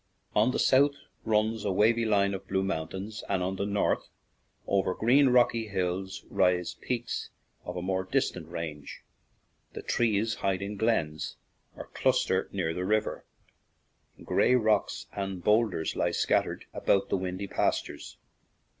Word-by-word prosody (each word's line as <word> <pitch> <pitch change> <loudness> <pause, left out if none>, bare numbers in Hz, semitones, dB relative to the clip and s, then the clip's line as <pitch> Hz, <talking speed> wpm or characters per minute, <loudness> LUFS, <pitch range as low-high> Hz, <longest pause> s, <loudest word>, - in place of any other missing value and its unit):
On 110 +3 +4
the 130 - -1
south 140 +2 +4 0.3
runs 110 0 +1
a 100 - 0
wavy 115 +4 +3
line 100 -2 +2
of 95 0 -6
blue 95 0 0
moun 80 -5 -2
tains; 105 +3 -6
and 95 -2 +1
on 95 +1 -2
the 100 - -1
north, 100 0 0 0.6
over 95 -2 +1
green, 130 +5 +4
rocky 120 -2 +3
hills, 95 -1 -3
rise 90 -1 +2
peaks 120 -2 -4 0.4
of - - -5
a 90 - -3
more 95 0 0
distant 95 - -1
range. 75 -4 -6 0.7
The - - -7
trees 110 -1 +1
hide 95 0 0
in 100 +1 -4
glens, 90 -9 -1 0.4
or - - -8
cluster 95 0 +1
near 90 -5 -1
the 90 - -3
river; 105 +3 -1 1.0
gray 125 - +3
rocks 110 -4 +1
and 95 -3 -4
boulders 105 -7 +2
lie - - +1
scattered - - 0
about 100 0 +1
the - - +1
windy 95 +1 -3
pastures. - - -2
100 Hz, 145 wpm, -29 LUFS, 95-110 Hz, 1.0 s, On